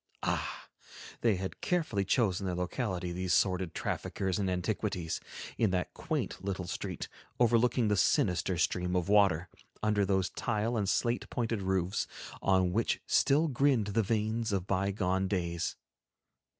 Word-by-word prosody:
Ah! - - -2 0.5
they 115 -4 +3
had 95 +1 -5
carefully 155 - 0
chosen 100 -2 +1
their 90 - -1
locality, 90 -1 -2
these 90 +1 0
sordid 95 -3 +1
traffickers 95 0 -2
in 95 -2 0
antiquities, 90 -2 -2 0.4
in 110 - +4
that 90 -1 -1
quaint - - -3
little 95 -2 -3
street, 90 - -4 0.3
overlooking 120 0 +3
the 105 - +3
sinister 90 -1 +2
stream 90 +1 0
of 90 +1 0
water, 95 -5 +4 0.4
under 105 -1 +2
those 95 -1 +1
tile 115 +1 -1
and 100 -4 0
slate 120 +4 0
pointed 115 -3 -1
roofs 95 0 0 0.3
on 95 -2 +3
which 115 +3 +1
still 145 +4 +3
grinned 135 -5 +2
the 115 - +3
vanes 110 +1 0
of 95 -3 0
bygone 95 -1 0
days. 85 -3 -1
100 Hz, 140 wpm, -31 LUFS, 90-110 Hz, 0.5 s, in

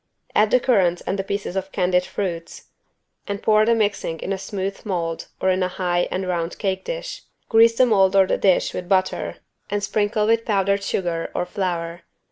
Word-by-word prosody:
Add 210 0 +4
the 250 - +4
currants 190 -9 +2
and 195 - -2
the - - 0
pieces 200 -1 -4
of 190 0 -3
candied 180 -1 +1
fruits 180 -3 -5 0.6
and 200 0 -3
pour 215 0 +3
the 230 - +4
mixing 205 -6 -1
in 195 - -2
a - - -2
smooth 195 0 -4
mold 170 -5 -3
or 190 - +2
in 185 0 0
a 185 - +2
high 175 -1 -1
and 185 0 -3
round 170 -1 -2
cake 190 -2 -2
dish. - - -5 0.3
Grease 230 +1 +5
the 255 - +6
mold 195 -5 +3
or 195 -1 +6
the - - -1
dish 190 -3 +2
with 180 -1 -5
butter 185 -1 0 0.3
and 205 0 -2
sprinkle 210 +1 0
with 230 +1 +2
powdered 200 -2 +1
sugar 175 -4 -2
or - - 0
flour. 175 -2 -3
195 Hz, 195 wpm, -22 LUFS, 180-210 Hz, 0.6 s, the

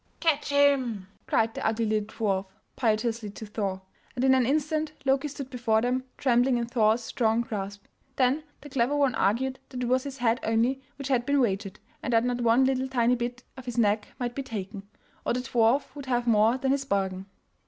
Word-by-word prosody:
"Catch 310 -4 +1
him!" 265 -9 +2 0.2
cried 225 0 +2
the - - -5
ugly 225 +1 +1
little 215 -1 0
dwarf 200 -4 -1 0.3
piteously 225 -1 0
to 220 - -7
Thor, 200 -3 -3 0.3
and 250 +1 0
in 265 - +6
an 255 -2 +3
instant 310 +2 0
Loki 270 +2 +2
stood 275 -2 -7
before 230 -3 +1
them, 250 +2 0
trembling 245 0 +3
in 235 - -1
Thor's 230 -1 +2
strong 225 0 +1
grasp. 200 -3 -5 0.3
Then 265 +3 +2 0.2
the 290 - -10
clever 265 +2 +1
one 280 -4 +2
argued 255 +6 0
that 250 -1 -4
it - - 0
was 255 +1 +2
his 275 -1 -6
head 240 -2 +1
only 235 +4 +1
which 275 0 -6
had 250 -3 +2
been 285 +2 +2
wagered, 195 -5 -1 0.2
and 245 - -2
that 230 0 +4
not 245 0 -1
one 235 +3 +4
little 260 0 +1
tiny 245 -2 +2
bit 245 +1 -4
of 260 - -10
his 245 -1 -5
neck 210 -2 +2
might 245 -1 -3
be 275 - -3
taken, 200 -5 -6 0.3
or - - 0
the 250 - -1
dwarf 245 +3 +1
would 280 -2 -8
have 245 -1 0
more 225 +1 +4
than 265 0 0
his 275 0 +1
bargain. 195 -5 -2
240 Hz, 205 wpm, -27 LUFS, 220-265 Hz, 0.3 s, in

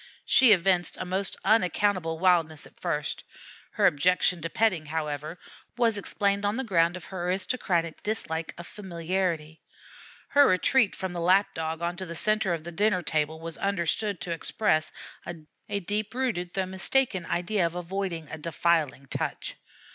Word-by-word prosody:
She 260 -4 +6
evinced 180 -2 +3
a - - -4
most 190 +2 -1
unaccountable 185 -4 +2
wildness 165 -4 +2
at - - -18
first. - - -2 0.5
Her - - +2
objection 180 +3 +3
to 165 - -3
petting, 180 -7 +1
however, 150 +1 -4 0.4
was 230 -3 +3
explained 200 0 0
on 205 +3 0
the 265 - -1
ground 175 -5 +2
of 180 - -11
her 180 -2 -5
aristocratic 180 -3 -1
dislike 165 -6 -3
of 170 - -8
familiarity. 170 -4 -3 0.7
Her 285 0 +6
retreat 205 +4 +3
from 190 -1 -4
the 175 - -3
Lap 185 +4 +3
dog 160 +1 -4
onto 175 +2 -3
the 170 - -6
centre 215 +1 +2
of 165 -2 -2
the 175 - -7
dinner 195 0 +1
table 155 0 -1
was 165 0 -5
understood 200 +1 0
to 175 - -4
express 160 -1 0 0.8
a 200 -1 -1
deep 210 +4 -3
rooted 195 -10 -2
though 190 -1 0
mistaken 190 +1 0
idea 180 +1 0
of 165 - -8
avoiding 180 -2 -4
a 160 - -6
defiling 160 -3 0
touch. - - -3
180 Hz, 155 wpm, -27 LUFS, 165-200 Hz, 0.8 s, She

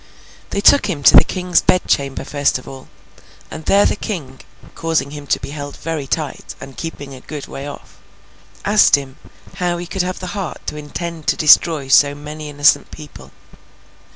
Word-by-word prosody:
They 200 - -2
took 280 0 +5
him 155 -8 -4
to - - +7
the - - +10
King's 180 -1 0
bed 185 - +2
chamber 140 -1 0
first 145 -1 0
of 130 - -14
all, 135 -1 -10 0.6
and 160 - -8
there 200 +1 +4
the - - +1
King 150 -12 -6 0.3
(causing 165 -4 -1
him 145 -1 -9
to - - +1
be - - -7
held 145 -1 -7
very 155 -3 -4
tight, 150 0 -4
and 135 -1 -10
keeping 145 -4 -7
a 130 - -11
good 150 0 -7
way 140 +1 -8
off), 145 - -11 0.7
asked 210 +1 +5
him 135 -1 -7 0.4
how 175 -2 -1
he 175 - -6
could 190 +2 -2
have 180 +1 -3
the 180 0 -6
heart 195 -7 -6
to - - -4
intend 160 +2 -7
to - - +3
destroy 155 -2 +4
so 145 +1 +5
many 150 +1 -8
innocent 145 0 +3
people? 135 - -12
150 Hz, 185 wpm, -18 LUFS, 140-175 Hz, 0.7 s, the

